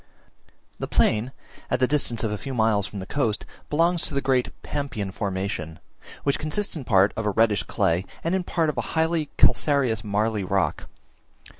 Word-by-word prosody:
The - - -3
plain, 110 +4 +2 0.4
at 125 - +1
the 130 - +4
distance 125 -5 0
of 110 - 0
a 105 - -2
few 135 +5 -5
miles 110 -3 +2
from 105 - -8
the 95 - -5
coast, 115 -2 -1 0.2
belongs 170 +3 +2
to 145 - -6
the - - +3
great 130 -2 +1
Pampean 110 -9 -3
formation, 95 -5 -3 0.5
which 140 - +1
consists 175 +7 -1
in 145 -5 -6
part 100 -2 +4
of 110 -1 -2
a - - +4
reddish 105 0 +3
clay, 85 +3 0 0.2
and 165 - 0
in 190 -1 +1
part 165 -2 0
of - - -2
a - - -4
highly 160 -1 +1
calcareous 130 -7 +3
marly 105 0 0
rock. 95 0 0
115 Hz, 180 wpm, -25 LUFS, 100-145 Hz, 0.5 s, the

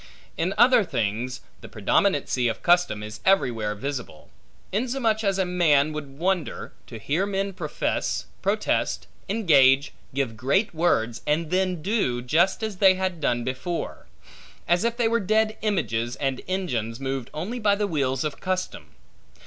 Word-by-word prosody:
In 180 +4 -1
other 240 -2 +6
things, 120 - -2 0.2
the - - -11
predominancy 125 -1 +1
of 115 - -3
custom 175 -12 +3
is 105 0 -8
everywhere 115 - +2
visible; 125 - -6 0.4
insomuch 230 0 0
as 195 -2 +1
a 190 - +1
man 155 -5 +3
would 140 -3 -7
wonder, 180 -1 -2
to 115 - -8
hear 150 - -1
men 195 0 -2
profess, - - -2 0.2
protest, - - 0 0.2
engage, 145 -10 +4 0.2
give 135 -5 -1
great 140 - +1
words, 120 -9 +1
and 155 +2 0
then 185 -3 0
do, 195 - 0
just 170 - +2
as 215 -3 -3
they 190 0 +6
have 185 -2 -2
done 120 -4 +1
before; 130 +8 -4 0.6
as 175 +3 +2
if 235 0 0
they 235 -2 +2
were 230 +1 +2
dead 215 +2 +1
images, 120 - -1
and 135 -2 -2
engines 125 - -2
moved 135 -2 -3
only 215 +11 -4
by 205 -2 +3
the 205 +1 0
wheels 135 -8 -1
of 150 -1 -4
custom. 185 0 -4
170 Hz, 150 wpm, -25 LUFS, 130-195 Hz, 0.6 s, other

